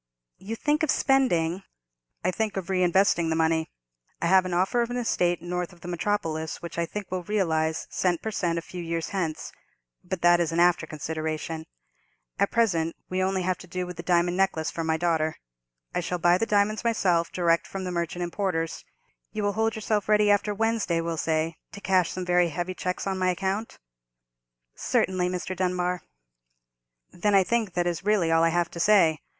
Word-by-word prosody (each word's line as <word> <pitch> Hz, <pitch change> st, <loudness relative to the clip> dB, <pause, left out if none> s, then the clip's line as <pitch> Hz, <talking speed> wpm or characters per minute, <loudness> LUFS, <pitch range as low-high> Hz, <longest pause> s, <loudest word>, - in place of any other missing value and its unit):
"You 210 Hz, +4 st, -5 dB
think 295 Hz, +6 st, 0 dB
of 315 Hz, -, +1 dB
spending——" 195 Hz, -, +2 dB, 0.6 s
"I 185 Hz, -, +2 dB
think 215 Hz, +1 st, -2 dB
of 190 Hz, -2 st, -4 dB
reinvesting 185 Hz, -2 st, +3 dB
the 160 Hz, -, +1 dB
money. 160 Hz, 0 st, +1 dB, 0.5 s
I -, -, -2 dB
have 185 Hz, +1 st, +5 dB
an 180 Hz, -, -3 dB
offer 190 Hz, +7 st, +2 dB
of 235 Hz, -, -1 dB
an 245 Hz, -, -3 dB
estate 175 Hz, -8 st, 0 dB
north 180 Hz, 0 st, -3 dB
of 175 Hz, -1 st, -18 dB
the -, -, -9 dB
metropolis, 165 Hz, -4 st, -2 dB
which 170 Hz, 0 st, -6 dB
I 170 Hz, -, 0 dB
think 205 Hz, 0 st, -6 dB
will 185 Hz, -1 st, -1 dB
realize 160 Hz, -5 st, 0 dB
cent 175 Hz, -3 st, +1 dB
per 220 Hz, -, -2 dB
cent 170 Hz, -5 st, -1 dB
a 165 Hz, -, -3 dB
few 180 Hz, +1 st, -7 dB
years 165 Hz, -1 st, -3 dB
hence: 170 Hz, -6 st, -3 dB, 0.5 s
but 180 Hz, -1 st, -5 dB
that 175 Hz, 0 st, +6 dB
is 170 Hz, -2 st, 0 dB
an 165 Hz, -, 0 dB
after 175 Hz, -2 st, +3 dB
consideration. 160 Hz, +1 st, -4 dB, 0.7 s
At -, -, +3 dB
present 170 Hz, -8 st, +1 dB
we 185 Hz, -, -1 dB
have 185 Hz, -, +2 dB
only 190 Hz, -1 st, -1 dB
to 185 Hz, 0 st, -2 dB
do 180 Hz, +1 st, -3 dB
with 180 Hz, 0 st, -7 dB
the 170 Hz, -, -6 dB
diamond 175 Hz, 0 st, +2 dB
necklace 190 Hz, -5 st, +1 dB
for 165 Hz, -, -3 dB
my 160 Hz, 0 st, +1 dB
daughter. 160 Hz, -2 st, 0 dB, 0.6 s
I 180 Hz, -, 0 dB
shall 180 Hz, +1 st, -2 dB
buy 175 Hz, +1 st, +4 dB
the 225 Hz, -, 0 dB
diamonds 210 Hz, +2 st, +2 dB
myself, 180 Hz, -8 st, +1 dB
direct 170 Hz, -2 st, +1 dB
from 195 Hz, -1 st, -5 dB
the 180 Hz, -, -3 dB
merchant 170 Hz, 0 st, -2 dB
importers. 175 Hz, -2 st, -2 dB, 0.5 s
You 215 Hz, -, -3 dB
will 205 Hz, 0 st, +1 dB
hold 220 Hz, +1 st, 0 dB
yourself 215 Hz, -1 st, -1 dB
ready 210 Hz, -1 st, +5 dB
after 205 Hz, +1 st, +2 dB
Wednesday, 220 Hz, -5 st, 0 dB
we'll 165 Hz, 0 st, -2 dB
say, 160 Hz, +1 st, 0 dB, 0.2 s
to -, -, -8 dB
cash 185 Hz, -3 st, +2 dB
some 185 Hz, -1 st, -4 dB
very 180 Hz, -1 st, +3 dB
heavy 175 Hz, +3 st, -3 dB
cheques 180 Hz, 0 st, -3 dB
on 190 Hz, -1 st, -2 dB
my 185 Hz, 0 st, +2 dB
account?" 195 Hz, +4 st, -2 dB, 1.0 s
"Certainly, 185 Hz, -1 st, 0 dB
Mr. 180 Hz, +1 st, -4 dB
Dunbar." 180 Hz, -1 st, -1 dB, 1.1 s
"Then 205 Hz, +3 st, +1 dB
I 195 Hz, -, +6 dB
think 220 Hz, -1 st, 0 dB
that 175 Hz, -1 st, +1 dB
is 175 Hz, -1 st, -2 dB
really 200 Hz, -5 st, +2 dB
all 165 Hz, 0 st, +4 dB
I 165 Hz, -, +4 dB
have 175 Hz, 0 st, 0 dB
to 170 Hz, -, -7 dB
say. 170 Hz, -5 st, +4 dB
180 Hz, 195 wpm, -26 LUFS, 170-195 Hz, 1.1 s, that